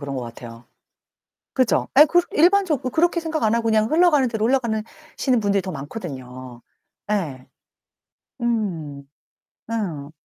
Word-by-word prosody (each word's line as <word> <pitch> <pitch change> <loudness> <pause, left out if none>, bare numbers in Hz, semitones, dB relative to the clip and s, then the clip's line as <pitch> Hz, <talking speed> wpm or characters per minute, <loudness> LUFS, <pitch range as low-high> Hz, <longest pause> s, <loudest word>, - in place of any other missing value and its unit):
그런 140 -2 -5
것 125 - -3
같아요. 115 0 -10 0.9
그죠? 255 -3 +1
예 300 - +10
그 350 +3 +3
일반적으로 330 -6 +3
그렇게 340 +1 +2
생각 320 -3 -3
안 220 +1 +3
하고 230 -1 -1
그냥 220 0 +2
흘러가는 310 -5 +4
대로 220 -1 -1
흘러가는 235 -5 0 0.3
시는 255 -4 +2
분들이 200 -1 +1
더 185 0 -6
많거든요. 130 - -8 0.5
예. 150 -11 -3 0.9
음. 175 -12 -2 0.7
어. 165 -11 -3
215 Hz, 280 characters per minute, -22 LUFS, -, 0.9 s, 예